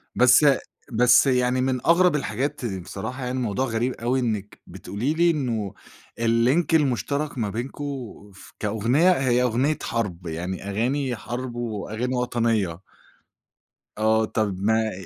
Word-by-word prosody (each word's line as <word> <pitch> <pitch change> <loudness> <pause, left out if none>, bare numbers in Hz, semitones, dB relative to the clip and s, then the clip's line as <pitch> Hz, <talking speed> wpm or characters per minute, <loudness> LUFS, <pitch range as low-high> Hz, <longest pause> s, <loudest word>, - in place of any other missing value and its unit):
بس 125 +4 +6 0.5
بس 125 +4 +5
يعني 125 0 +2
من 130 -1 0
أغرب 175 -1 +4
الحاجات 130 0 -2
بصراحة 100 +6 -5
يعني 130 +1 -2
موضوع 125 +2 -1
غريب 120 +1 -1
أوي 125 +3 -1
إنِّك 105 -4 -3
بتقولي 120 +10 -3
لي 170 +1 +3
إنه 115 - -2 0.5
الlink 115 +8 +3
المُشترَك 140 0 0
ما 105 -3 -1
بينكم 125 +7 -5 0.5
ف - - -14
كأغنية، 115 - +2
هي 130 -6 +2
أغنية 130 +5 +1
حرب، 95 -7 -3
يعني 90 +4 -4
أغاني 125 +5 -1
حرب 120 +2 -6
وأغاني 115 +2 -3
وطنية. 115 -8 0 1.2
آه، 110 0 +3
طَب 105 -3 -1
ما 110 +1 +2
120 Hz, 130 wpm, -24 LUFS, 110-130 Hz, 1.2 s, بس